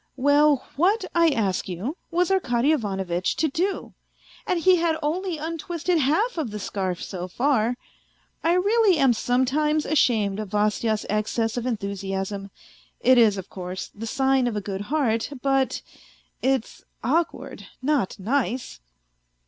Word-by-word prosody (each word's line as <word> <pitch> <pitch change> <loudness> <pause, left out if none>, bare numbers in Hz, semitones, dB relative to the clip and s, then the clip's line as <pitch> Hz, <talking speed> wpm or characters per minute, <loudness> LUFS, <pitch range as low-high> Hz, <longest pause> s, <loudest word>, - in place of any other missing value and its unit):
Well, 285 +1 +4
what, 395 +8 +2
I 335 -1 +4
ask 200 -9 -1
you, 195 - -4
was 355 +2 +1
Arkady 270 -7 +2
Ivanovitch 190 - -1
to 315 - +1
do? 360 +7 -2 0.5
And 365 -4 +1
he 370 +2 +5
had 330 -1 +1
only 345 +3 -1
untwisted 330 +2 -2
half 330 - +1
of 290 -7 -2
the 210 - -6
scarf 190 -3 -3
so 180 -2 -5
far. 245 +2 +1 0.7
I 335 - +3
really 400 +1 +3
am 270 -4 +4
some 245 +3 +1
times 300 +3 +1
ashamed 220 -9 +2
of 215 -2 -5
Vasya's 210 +1 0
excess 220 +2 -1
of 245 0 -2
enthusiasm; 195 -2 -3 0.5
it 255 -1 +5
is, 215 -4 +5
of 190 0 -7
course, 185 0 -6
the 225 +2 -7
sign 265 0 +2
of 235 - -2
a - - 0
good 195 -1 -4
heart, 230 -1 0
but... 270 -1 +1 0.6
it's 265 -3 -1 0.2
awkward, 320 +8 -1
not 265 -7 0
nice 245 - -2
255 Hz, 145 wpm, -24 LUFS, 210-315 Hz, 0.7 s, he